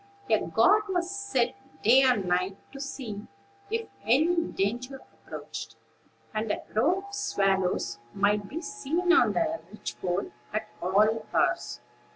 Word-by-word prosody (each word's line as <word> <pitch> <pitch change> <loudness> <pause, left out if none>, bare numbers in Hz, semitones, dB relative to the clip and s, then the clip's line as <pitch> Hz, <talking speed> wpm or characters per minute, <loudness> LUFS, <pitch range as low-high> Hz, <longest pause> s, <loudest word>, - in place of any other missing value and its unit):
A - - +5
guard 425 0 +4
was 360 -1 0
set 395 -12 0 0.3
day 250 +5 +7
and 250 -7 +3
night, 180 +2 0
to 275 - -9
see 245 -7 -6 0.4
if 455 +1 -2 0.2
any 310 +9 +4
danger 245 +7 -2 0.3
approached; - - -7 0.6
and 215 0 -1
a - - -3
row 335 - +2
of 400 - -14
swallows 190 - 0
might 205 +3 +1
be 325 +4 -4
seen 355 -3 0
on 335 - +5
the 325 -1 0
ridgepole 190 -3 -3 0.2
at 215 - -2
all 215 +5 +3
hours. - - +1
245 Hz, 135 wpm, -28 LUFS, -, 0.6 s, day